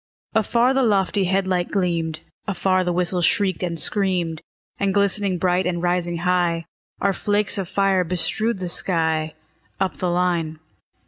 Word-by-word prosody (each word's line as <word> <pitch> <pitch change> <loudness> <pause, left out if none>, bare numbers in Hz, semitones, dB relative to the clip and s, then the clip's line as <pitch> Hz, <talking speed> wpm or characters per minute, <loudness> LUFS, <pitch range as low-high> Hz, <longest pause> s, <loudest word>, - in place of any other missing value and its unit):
Afar 235 +4 +2
the 270 - +2
lofty 200 -4 +2
head 190 +1 +1
light 180 -1 0
gleamed; 165 -4 -1 0.3
Afar 185 -1 +1
the 180 - -1
whistle 180 +1 0
shrieked 190 0 +2
and 170 -2 -2
screamed; 180 -6 0 0.4
And 200 -1 0
glistening 200 -1 +2
bright, 180 +1 +1
and 175 -1 -1
rising 175 0 0
high, 175 -1 0 0.3
Our 200 0 +1
flakes 205 +2 +1
of 185 -3 -4
fire 195 -2 +2
bestrewed 180 +6 -1
the 185 -1 -4
sky, 160 -3 +1 0.4
Up 190 -1 -1
the 180 - -1
line. 175 -3 0
180 Hz, 150 wpm, -22 LUFS, 175-195 Hz, 0.4 s, Afar